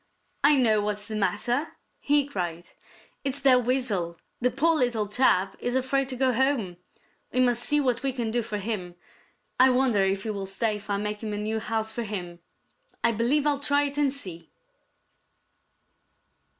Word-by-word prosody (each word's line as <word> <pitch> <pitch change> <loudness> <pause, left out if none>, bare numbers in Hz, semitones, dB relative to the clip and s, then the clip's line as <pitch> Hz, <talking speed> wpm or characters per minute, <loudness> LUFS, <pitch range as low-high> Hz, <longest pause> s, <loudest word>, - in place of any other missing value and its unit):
"I 290 +1 +7
know 220 -5 +3
what's 210 0 -2
the 220 - -5
matter!" 240 - -1 0.2
he 290 -1 +2
cried. 175 -10 -5 0.5
"It's 275 0 -1
that 255 -2 +5
Weasel. 210 -10 0 0.2
The 250 - +2
poor 295 +7 +2
little 240 -7 0
chap 200 -4 +2
is 245 +1 -2
afraid 260 +1 0
to 260 - -3
go 260 0 +2
home. 240 -8 0 0.5
We 255 - +1
must 245 -2 +3
see 295 +3 +3
what 250 -4 0
we 275 - 0
can 240 -3 -3
do 240 +1 +1
for 215 -2 -4
him. 195 -4 -4 0.6
I 260 +1 +7
wonder 250 -6 +2
if 195 0 0
he 220 - -2
will 200 -2 -5
stay 210 +2 -1
if 210 +1 -14
I 200 - +1
make 210 +1 -3
a 220 - -5
new 210 +1 -2
house 220 0 -2
for 235 - -4
him. 180 -6 -5 0.6
I 235 - +4
believe 240 +7 +1
I'll 290 -2 +1
try 285 0 +2
it 285 0 -2
and 285 -2 +2
see." 185 -12 -7
235 Hz, 175 wpm, -26 LUFS, 205-265 Hz, 0.6 s, I